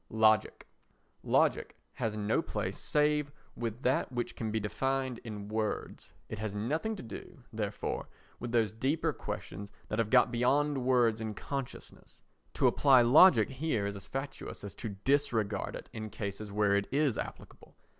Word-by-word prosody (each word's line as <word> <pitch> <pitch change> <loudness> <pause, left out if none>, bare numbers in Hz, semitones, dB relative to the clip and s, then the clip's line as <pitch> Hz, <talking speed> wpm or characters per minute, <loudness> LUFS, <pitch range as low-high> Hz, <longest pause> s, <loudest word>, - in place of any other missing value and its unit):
Logic 110 -1 +3 0.6
Logic - - +1 0.2
has 110 -1 -2
no 105 +1 +1
place - - -3
save 150 -1 +1 0.2
with 115 +1 -4
that 130 0 +1
which 120 -1 -3
can 110 - -3
be 110 +1 0
defined 130 +3 -1
in 105 -3 -7
words. 110 0 -3 0.2
It 110 - -6
has 110 -2 -3
nothing 155 - -1
to - - -8
do, 130 +5 -10
therefore, 105 -2 -3 0.3
with 120 0 -5
those 115 -3 +2
deeper 135 +8 0
questions 100 +2 -6 0.2
that 110 - -2
have 115 -2 +1
got 125 -1 +5
beyond 135 +3 +2
words 120 -3 +3
and 110 -2 -4
consciousness. 135 -3 -7 0.3
To - - +2
apply 135 -4 +6
logic 125 - +7
here 130 -6 -1
is 100 0 -3
as 100 - -9
fatuous 135 -4 -6
as 100 -2 -6
to 115 - -5 0.2
disregard 115 -8 +1
it - - -8
in 110 -1 -5
cases 100 0 -5
where 100 -1 +2
it 100 0 0
is 140 -3 +1
applicable. - - -8
115 Hz, 160 wpm, -31 LUFS, 105-135 Hz, 0.6 s, logic